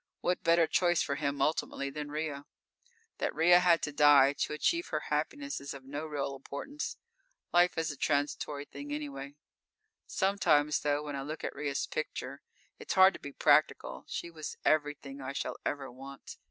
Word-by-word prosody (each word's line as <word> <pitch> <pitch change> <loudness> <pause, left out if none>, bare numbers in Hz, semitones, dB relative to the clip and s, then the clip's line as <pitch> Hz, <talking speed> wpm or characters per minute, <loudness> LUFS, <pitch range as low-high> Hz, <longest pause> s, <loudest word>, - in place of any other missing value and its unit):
What 180 0 0
better 170 0 +4
choice 175 0 +2
for - - -2
him 140 0 -1
ultimately 140 -2 -1
than 150 +1 -5
Ria? 150 -2 -4 0.7
That - - -1
Ria 175 +2 +6
had 175 -2 +4
to 150 - -1
die 145 -2 +6
to - - -2
achieve 340 - 0
her - - -1
happiness 285 -1 -2
is 140 0 -6
of 135 - -10
no 145 +3 -5
real 140 -2 -3
importance. 140 - -6 0.6
Life 175 0 +4
is 160 -1 0
a - - -7
transitory 145 0 -1
thing 145 0 -9
anyway. 140 -1 -5 0.7
Sometimes, 170 -7 +2
though, 145 0 0
when 145 -1 -5
I 135 - -3
look 150 +3 -6
at - - -3
Ria's 145 -1 -2
picture, 140 -3 -5 0.4
it's - - -4
hard 190 0 +7
to - - -9
be 145 - -8
practical. 150 +2 +2
She 170 - -5
was 155 -2 -7
everything 145 -2 0
I 135 +1 -5
shall - - -3
ever 140 -2 -3
want. 135 +2 -10
145 Hz, 175 wpm, -31 LUFS, 140-160 Hz, 0.7 s, hard